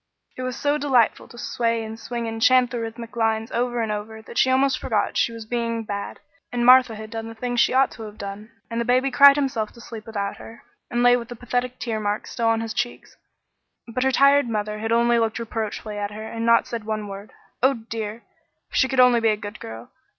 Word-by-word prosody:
It - - -6
was 255 -1 -3
so 290 +1 +1
delightful 260 -6 +2
to 240 - -14
sway 230 -1 -1
and 220 +1 -7
swing 235 0 -4
and 225 0 -5
chant 255 +1 +5
the 240 - -3
rythmic 230 +1 -7
lines 225 -1 0
over 240 0 0
and 220 - -2
over 215 +1 -5
that 260 - +1
almost 260 0 +3
she - - -13
forgot - - 0
she - - +2
was 230 -1 -8
being 230 0 -2
bad, 200 -1 -5 0.3
and 240 -1 0
Martha 250 -2 +7
had 215 0 -9
done 225 -1 -5
the 225 - -9
things 245 +1 -2
she - - +4
ought 265 +1 +3
to 230 - -11
have 215 -1 -9
done, 200 +3 -7 0.2
and 230 0 -1
the - - -2
baby 255 +2 +2
cried 280 +2 +8
himself 255 -7 -1
to - - -15
sleep 225 -2 -9
without 200 -3 -3
her, 225 - -12 0.3
and 240 0 0
lay 245 0 +7
with 235 -2 -4
the 240 - -8
pathetic 245 +1 -2
tear 225 -3 -3
marks 205 0 -3
still 235 -2 -1
on 225 0 +2
his 225 -1 -4
cheeks, 240 0 -4 0.7
but 255 +2 -1
her 265 - +3
tired 275 0 +4
mother 210 -1 -2
had 225 +1 -3
only 235 0 +3
looked 225 -1 0
reproachfully 220 -2 -4
at 205 0 -2
her 215 +1 -8
and 220 - -8
had 230 - -4
not 230 0 +4
said 230 -2 -5
one 215 -1 -3
word. 200 +1 -9 0.3
Oh, 265 +2 +4
dear! 225 -1 -6 0.5
If - - -2
she 260 - +4
could 265 -1 -1
only 250 -1 +6
be 225 -1 +3
a 215 - +1
good 205 0 -8
girl! 110 +1 -9
230 Hz, 240 wpm, -23 LUFS, 220-245 Hz, 0.7 s, cried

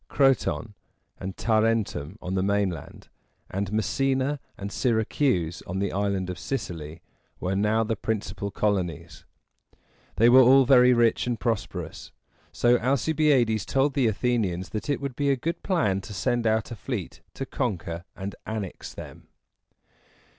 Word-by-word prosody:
Croton 135 -5 +1 0.5
and 95 0 -6
Ta 110 -2 +2
ren´tum 105 -7 -1
on 90 +1 -3
the 95 - +1
mainland, 100 -4 -2 0.4
and 100 +1 -2
Messina 135 +6 0 0.2
and 100 0 -6
Syr´a 110 -3 +1
cuse 90 - 0
on 90 - -3
the 100 -1 -1
Island 100 -1 -1
of 90 - -8
Sicily, 85 - -5 0.4
were 95 +2 -1
now 105 +3 +2
the 115 0 -1
principal 100 -1 -3
colonies. 95 -6 -2 0.9
They 115 +3 +5
were 130 +2 +8
all 130 +2 +7
very 125 -1 +6
rich 120 0 +3
and 120 -2 -1
prosperous, 115 -4 -3 0.4
so 120 0 +3
Alcibiades 135 - +2
told 135 +1 +1
the 130 -4 +2
Athenians 100 -6 0
that 110 +6 -5
it 145 - 0
would 140 -3 -4
be 140 +1 0
a 135 - +4
good 165 +7 -3
plan 105 - +1
to 100 - -9
send 115 +5 0
out 110 0 +1
a - - -4
fleet 100 - -5
to 135 - -4
conquer 90 -11 -3
and 95 +1 -5
annex 110 -4 -5
them. - - -10
110 Hz, 150 wpm, -26 LUFS, 95-125 Hz, 0.9 s, were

